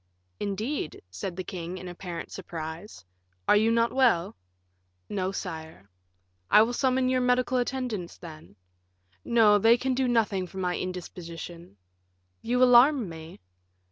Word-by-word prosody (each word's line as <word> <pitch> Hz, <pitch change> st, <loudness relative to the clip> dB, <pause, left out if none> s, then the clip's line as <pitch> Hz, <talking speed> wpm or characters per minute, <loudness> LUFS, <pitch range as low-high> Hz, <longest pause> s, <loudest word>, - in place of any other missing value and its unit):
"Indeed," 205 Hz, -, -3 dB
said 130 Hz, -, -5 dB
the 185 Hz, -, -4 dB
king, 180 Hz, 0 st, -6 dB
in 185 Hz, -, -8 dB
apparent 175 Hz, -1 st, -7 dB
surprise; 165 Hz, -, -7 dB, 0.4 s
"are -, -, +6 dB
you 220 Hz, +2 st, +4 dB
not 230 Hz, 0 st, +2 dB
well?" 230 Hz, -9 st, +2 dB, 0.7 s
"No, 190 Hz, -2 st, -2 dB
sire." 160 Hz, -, -7 dB, 0.6 s
"I 210 Hz, -, +7 dB
will 235 Hz, +2 st, -2 dB
summon 260 Hz, 0 st, +1 dB
your 255 Hz, 0 st, +2 dB
medical 250 Hz, 0 st, +2 dB
attendants, 245 Hz, -8 st, -3 dB
then." 155 Hz, -, -12 dB, 0.7 s
"No, 220 Hz, -3 st, +5 dB
for -, -, -1 dB
they 225 Hz, +3 st, +5 dB
can 260 Hz, +1 st, -1 dB
do 260 Hz, 0 st, +1 dB
nothing 215 Hz, -6 st, +1 dB
for 190 Hz, -, -12 dB
my 180 Hz, -1 st, -1 dB
indisposition." 170 Hz, -, -7 dB, 0.6 s
"You 250 Hz, +2 st, +2 dB
alarm 250 Hz, -, +6 dB
me." 160 Hz, -, -10 dB
195 Hz, 140 wpm, -27 LUFS, 170-245 Hz, 0.7 s, I